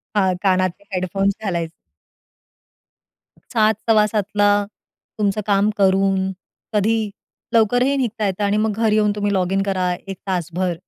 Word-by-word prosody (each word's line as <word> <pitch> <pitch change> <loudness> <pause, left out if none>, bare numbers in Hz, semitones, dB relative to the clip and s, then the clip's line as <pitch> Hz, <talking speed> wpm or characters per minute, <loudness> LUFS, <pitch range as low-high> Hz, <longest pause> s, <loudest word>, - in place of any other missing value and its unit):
हां, 190 -3 +3
कानाचे 185 -1 +1
हेडफोन्स 195 +2 0
घालायचे. 170 -5 -2 1.8
7 220 -1 +4 0.2
सव्वासातला 210 -1 +3 0.7
तुमचं 210 0 +1
काम 200 0 +3
करून, 190 -1 +2 0.4
कधी 215 +1 +1 0.4
लवकरही 245 +5 +3
निघता 230 -4 -1
येतं 195 +2 -2
आणि 205 +1 +1
मग 215 +1 +1
घरी 220 -1 +2
येऊन 210 -1 +3
तुम्ही 205 -1 -1
लॉगिन 190 +1 +1
करा. 185 -2 0
एक 195 -1 -6
तासभर. 180 0 -1
200 Hz, 120 wpm, -20 LUFS, 190-215 Hz, 1.8 s, 7